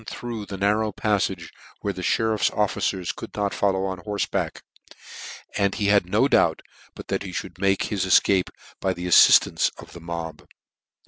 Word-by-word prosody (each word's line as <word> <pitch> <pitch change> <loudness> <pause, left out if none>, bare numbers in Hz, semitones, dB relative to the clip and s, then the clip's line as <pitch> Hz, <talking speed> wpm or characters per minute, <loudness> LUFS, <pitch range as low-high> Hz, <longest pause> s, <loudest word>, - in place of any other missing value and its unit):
407 - - -7
through 115 -3 -5
the 100 - -6
narrow 105 +2 +1
pafTage, 100 -6 -1 0.3
where 100 - -2
the 90 - -7
meriffs 110 +3 +1
officers 95 -3 -1
could - - -10
not 100 -1 -1
follow 95 -1 0
on 95 -1 -4
horfeback; 105 +2 -3 0.9
and 100 -1 +1
he 100 -2 0
had 100 -3 +3
no 110 +8 +3
doubt - - +2 0.3
but - - -9
h^ 95 -3 -3
mould 90 -1 -13
make 95 0 +1
his 100 -4 -2
efcape, 95 0 +3 0.3
by 95 - 0
the 90 - -6
affiftance 90 - +5
of - - -13
the 85 - -11
mob. 85 -2 -7
100 Hz, 170 wpm, -24 LUFS, 90-105 Hz, 0.9 s, affiftance